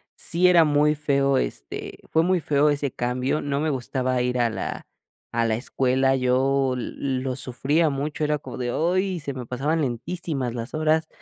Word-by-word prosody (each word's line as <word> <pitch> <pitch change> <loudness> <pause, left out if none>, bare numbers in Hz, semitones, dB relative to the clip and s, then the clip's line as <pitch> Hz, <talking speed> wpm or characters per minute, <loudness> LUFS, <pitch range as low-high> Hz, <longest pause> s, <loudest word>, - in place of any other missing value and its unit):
sí 180 +2 +2
era 170 -3 +6
muy 150 +1 +3
feo, 140 -2 +1
este - - -4
fue 160 - +4
muy 180 0 +2
feo 150 0 +3
ese 145 -2 0
cambio, 125 +4 -1
no 140 0 -1
me 155 - 0
gustaba 130 -1 -1
ir 125 0 0
a 120 -1 +3
la - - -5 0.5
a 115 0 +1
la 110 -1 +1
escuela, 130 +2 +1
yo 130 +1 +2
l 130 +1 -3
lo 130 -1 -2
sufría 145 +6 +1
mucho, 145 +2 -3
era 150 0 +1
como - - -8
de, 120 -1 -2
¡oy! 185 +2 0
Se 140 -1 -4
me 125 -2 -6
pasaban 145 +7 -1
lentísimas 135 0 -3
las 115 +1 -6
horas. 155 +1 +1
135 Hz, 180 wpm, -24 LUFS, 125-155 Hz, 0.5 s, era